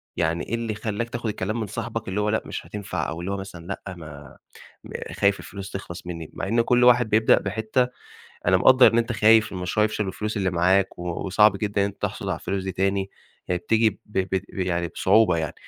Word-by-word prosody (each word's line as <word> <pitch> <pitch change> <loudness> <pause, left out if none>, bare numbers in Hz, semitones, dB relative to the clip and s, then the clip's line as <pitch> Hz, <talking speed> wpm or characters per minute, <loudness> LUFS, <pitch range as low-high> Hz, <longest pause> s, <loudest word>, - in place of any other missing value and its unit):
يعني 85 +1 0
إيه 115 - -1
اللي 115 -1 -3
خلّاك 110 +2 -3
تاخُد 120 -1 -3
الكلام 105 +2 -3
من 110 - -3
صاحبك 115 +2 -5
اللي 95 +2 -1
هو 105 - 0
لأ، 110 - +1
مش - - -6
هتنفع 100 -2 -4
أو 80 - -5
اللي 95 +3 -4
هو 100 - -2
مثلًا 95 -3 -9
لأ، 95 -1 -6
ما 75 -4 -11 0.5
م - - -12 0.2
خايف 100 0 +2
الفلوس 100 -1 -8
تخلص 90 -2 -7
منّي 85 -3 -6
مع - - -4
إن 115 +3 +3
كل 125 +1 +3
واحد 120 -2 +5
بيبدأ 110 +1 +4
بحتّة 110 +5 0 0.6
أنا 95 +1 +5
مقدّر 130 +4 +6
إن 115 - +3
أنت 115 +1 0
خايف 110 -1 +4
إن - - -5
المشروع 90 +4 0
يفشل 105 0 -1
والفلوس 105 +3 -4
اللي 95 -2 +1
معاك 95 +2 +2
و - - -6 0.2
وصعب 100 +2 +4
جدًا 100 0 -1
إن 100 - +3
أنت 100 - -9
تحصل - - -3
على - - -1
الفلوس 95 -1 -3
دي 95 - -3
تاني، 95 +1 0 0.4
هي 90 - 0
بتيجي 110 +4 +2
ب 100 - -15
ب 95 -2 -2 0.2
ب - - -11
يعني 85 -2 -1
بصعوبة 95 +1 +3
يعني. 80 -2 -3
100 Hz, 225 wpm, -24 LUFS, 95-110 Hz, 0.6 s, مقدّر